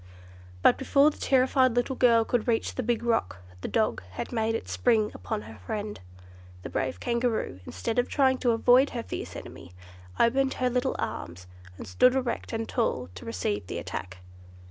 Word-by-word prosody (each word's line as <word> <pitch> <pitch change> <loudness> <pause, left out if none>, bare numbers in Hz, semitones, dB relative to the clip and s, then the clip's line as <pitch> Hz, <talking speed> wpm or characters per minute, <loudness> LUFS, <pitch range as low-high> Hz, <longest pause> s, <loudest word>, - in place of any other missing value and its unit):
But - - +5
before 280 +2 +4
the - - -15
terrified 260 -1 +3
little 245 +2 0
girl 230 -3 +4
could 240 0 0
reach 230 -2 0
the - - -2
big 235 -1 -1
rock, 225 - 0 0.2
the - - -3
dog 220 -2 0
had - - -5
made 225 -1 0
its - - -5
spring 220 -3 +2
upon 90 +3 -4
her 110 0 -12
friend. 205 - -5 0.6
The - - -7
brave 130 -1 -2
Kangaroo, 235 - -1
instead 230 +1 -2
of 245 - 0
trying 260 -2 +3
to 245 - +1
avoid 245 +4 +5
her 230 - -3
fierce - - -6
enemy, 85 - -10 0.5
opened 265 +3 +3
her 250 -1 0
little 250 +1 0
arms, 85 +1 -5 0.3
and - - -8
stood 250 - +4
erect 250 -3 -2
and 225 0 -3
tall 225 - -1
to 90 - -10
receive 100 -2 -2
the - - -4
attack. 95 0 -6
235 Hz, 180 wpm, -27 LUFS, -, 0.6 s, But